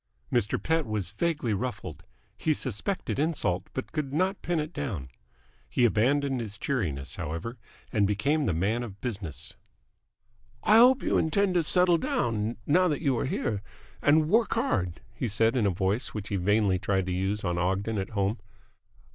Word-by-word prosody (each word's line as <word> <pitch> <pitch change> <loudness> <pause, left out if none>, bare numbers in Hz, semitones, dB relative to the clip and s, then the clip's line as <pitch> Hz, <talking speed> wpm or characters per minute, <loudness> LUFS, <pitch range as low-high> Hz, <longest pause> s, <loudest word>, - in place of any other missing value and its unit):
Mr. 115 -4 +2
Pett 160 -4 0
was 105 -4 -2
vaguely 145 -1 -1
ruffled. 120 +5 -4 0.3
He 155 -1 +1
suspected 135 - -2
insult, 145 - 0
but 130 - -5
could 150 -4 -3
not 185 +6 0
pin 175 -2 0
it 150 +3 -4
down. 105 - -4 0.6
He 125 - +3
abandoned 135 +4 +2
his 105 -3 -5
cheeriness, 85 - -2
however, 85 - -5 0.3
and 105 -3 +3
became 140 +10 +1
the 90 - +1
man 105 +8 0
of 105 -5 -7
business. 100 - -5 1.1
"I 215 - +6
hope 250 +3 +6
you - - +2
intend 185 +4 +2
to 175 - +3
settle 175 +1 +3
down, 115 -4 -1
now 180 +5 +4
that 150 -2 -1
you 135 -4 +2
are - - -1
here, 110 -6 -1 0.4
and 150 +1 +4
work 225 +7 +3
hard," 95 - 0
he 120 - -2
said 115 +2 +2
in 120 -5 +2
the - - +4
voice 95 +7 -1
which 105 -1 -5
he 100 - -1
vainly 100 0 +2
tried 95 -1 0
to 95 - -3
use 95 +3 -1
on 85 -2 -1
Ogden 95 +4 0
at 95 - -3
home. 100 +2 -1
115 Hz, 170 wpm, -28 LUFS, 100-150 Hz, 1.1 s, I